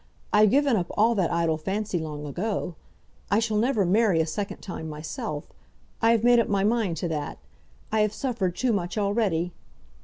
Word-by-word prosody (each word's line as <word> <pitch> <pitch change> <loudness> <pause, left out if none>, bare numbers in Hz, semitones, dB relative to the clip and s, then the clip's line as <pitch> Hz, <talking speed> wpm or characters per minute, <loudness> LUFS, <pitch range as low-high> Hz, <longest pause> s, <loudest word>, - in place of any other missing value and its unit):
I've 210 0 +6
given 280 +1 +3
up 180 -4 0
all 225 +3 +4
that 190 -6 +1
idle 165 -2 +1
fancy 195 +3 -2
long 150 -2 -5
ago. 180 +5 -3 0.6
I 200 - +3
shall 220 -1 +1
never 225 -2 +2
marry 195 -1 +3
a 160 - +3
second 195 +6 -4
time 160 -4 -7
myself. 150 -1 -5 0.5
I 225 - +4
have 230 -1 +3
made 240 0 +6
up 230 - +1
my 200 -1 +1
mind 210 -6 +1
to 175 - -2
that. 150 -2 -3 0.5
I 220 - +2
have 210 -1 +3
suffered 215 -7 -2
too 245 +4 +1
much 180 0 -2
already." 200 -5 0
200 Hz, 185 wpm, -26 LUFS, 170-220 Hz, 0.6 s, I've